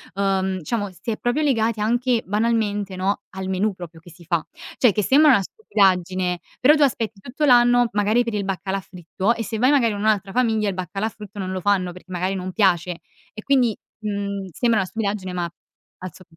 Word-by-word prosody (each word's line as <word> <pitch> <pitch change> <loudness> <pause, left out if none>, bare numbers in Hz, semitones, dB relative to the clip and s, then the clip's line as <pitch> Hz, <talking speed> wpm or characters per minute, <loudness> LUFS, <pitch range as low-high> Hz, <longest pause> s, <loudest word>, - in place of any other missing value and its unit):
ehm, 190 -1 0
diciamo 205 +3 -2
si 185 +5 -6
è 215 - -3
proprio 245 +5 0
legati 230 -6 +1
anche 240 +2 +1
banalmente, 205 -2 0
no, 190 +2 -1
al 190 0 -6
menù 190 +3 0
proprio 175 -3 -10
che 165 - -16
si 170 +2 -16
fa. 170 -1 -1 0.3
Cioè, 245 - +5
che 210 +1 -1
sembra 295 +6 +6
una 235 - +4
stupidaggine, 185 - 0 0.2
però 290 +4 +6
tu 300 - 0
aspetti 225 -6 -1
tutto 245 +9 -3
l'anno, 245 -2 +5
magari 210 +4 +2
per 230 -2 -4
il 205 -1 -1
baccalà 195 0 -2
fritto, 185 +4 -2
e 230 - -4
se 220 0 -4
vai 255 +5 +3
magari 240 -7 +3
in 205 - -5
un'altra 205 -2 +1
famiglia 220 -2 +1
il 200 - 0
baccalà 190 +3 -3
fritto 210 -1 -11
non 185 -1 -3
lo 185 0 -3
fanno 185 -2 +1
perché 180 +1 -14
magari 185 +1 -1
non 185 0 -4
piace. 180 -3 +1 0.3
E 215 - -9
quindi, 250 -6 +2 0.2
mhmm, 200 -2 -3
sembra 230 - +1
una 190 - -1
stupidaggine 200 -3 -3
ma 175 -1 -2 0.5
al 185 -3 -7
so 185 - -15
205 Hz, 205 wpm, -22 LUFS, 185-230 Hz, 0.5 s, sembra